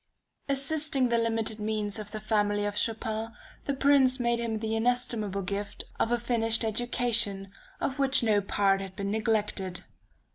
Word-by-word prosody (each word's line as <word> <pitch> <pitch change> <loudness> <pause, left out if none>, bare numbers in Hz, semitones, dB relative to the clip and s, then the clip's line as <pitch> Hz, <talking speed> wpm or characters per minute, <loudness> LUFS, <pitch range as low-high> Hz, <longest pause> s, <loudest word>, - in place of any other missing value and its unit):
Assisting 275 -1 +1
the 235 0 +2
limited 225 -1 -1
means 210 -1 -2
of 210 -1 -7
the 215 - -6
family 205 -1 0
of 205 0 -2
Chopin, 220 +1 -1 0.3
the 280 - 0
Prince 270 -2 +4
made 235 -1 +1
him 230 -2 -2
the 220 0 -2
inestimable 225 -4 0
gift 200 +2 -4 0.2
of 225 - +1
a 240 - +3
finished 230 -1 +1
education, 220 -3 0 0.3
of 275 +1 -2
which 270 -2 +5
no 210 -3 +3
part 195 0 +1
had 190 -1 -8
been 200 -1 -3
neglected. 210 -4 -1
220 Hz, 155 wpm, -28 LUFS, 205-240 Hz, 0.3 s, which